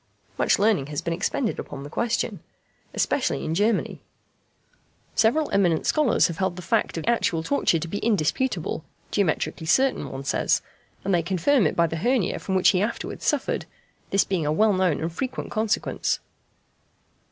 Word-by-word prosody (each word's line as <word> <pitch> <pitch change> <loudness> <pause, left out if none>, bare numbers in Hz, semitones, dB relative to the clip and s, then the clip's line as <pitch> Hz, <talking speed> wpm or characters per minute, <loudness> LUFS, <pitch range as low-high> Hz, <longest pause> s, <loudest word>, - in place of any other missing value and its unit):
Much - - +2
learning 200 -10 +2
has 145 -1 -3
been 170 - -2
expended 210 +7 -1
upon 140 -1 -7
the - - -7
question, 235 +5 -1 0.5
especially 265 - 0
in 160 - -1
Germany. 210 +5 0 1.1
Several 290 +8 +3
eminent 175 -5 +2
scholars 300 -6 +3
have 170 - -2
held 190 -2 0
the 180 - -8
fact - - 0
of 165 - -3
actual 180 -8 +1
torture 280 -7 +2
to 165 +1 -4
be 205 +5 -3
indisputable 205 - 0 0.3
(geometrically 165 -3 -1
certain, 265 +11 +2
one 135 0 -6
says), 140 - +1 0.4
and 195 - +1
they 175 - +3
confirm 190 - +2
it - - -3
by 170 - +4
the 165 0 -3
hernia 240 +2 +1
from 190 - -3
which 185 - +5
he 185 - +2
afterwards 220 +3 -3
suffered, - - 0 0.4
this 195 - +3
being 185 -4 -1
a 150 - 0
well 210 +7 +3
known 185 -5 +1
and 165 +1 -3
frequent 255 +8 -4
consequence. 220 -1 0
190 Hz, 165 wpm, -25 LUFS, 165-225 Hz, 1.1 s, which